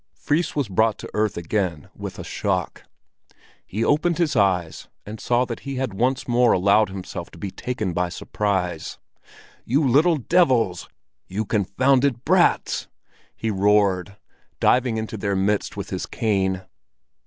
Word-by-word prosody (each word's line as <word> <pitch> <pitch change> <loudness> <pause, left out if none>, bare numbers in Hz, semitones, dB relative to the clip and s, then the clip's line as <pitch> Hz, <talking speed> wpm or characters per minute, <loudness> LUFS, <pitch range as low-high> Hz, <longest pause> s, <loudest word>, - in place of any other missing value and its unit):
Fris 155 +3 -1
was 145 -5 0
brought 110 +3 +2
to - - -8
earth 105 -1 0
again 85 -3 -2
with - - -7
a - - -6
shock. - - -2 0.8
He 110 +4 -2
opened 165 +3 +2
his 165 -5 +1
eyes, 90 -6 +1 0.2
and 105 +1 -8
saw 120 +1 +1
that 115 -2 -5
he 140 -1 -6
had 130 -5 -2
once 125 +6 0
more 120 0 +4
allowed 100 +3 +3
himself 95 -1 -7
to - - -15
be 100 - -5
taken 110 -7 -3
by 90 +1 0
surprise. 90 -2 -2 0.7
"You 140 +4 +1
little 155 +6 +4
devils! 130 - +2 0.4
You 105 +4 -3
confounded 125 +5 +1
brats!" 180 +2 +2 0.5
he 110 - -2
roared, 100 -1 +2 0.4
diving 125 -2 +3
into 110 0 -4
their 100 -1 -1
midst 100 +2 0
with - - -6
his - - -3
cane. 95 -4 0
110 Hz, 145 wpm, -23 LUFS, 95-130 Hz, 0.8 s, more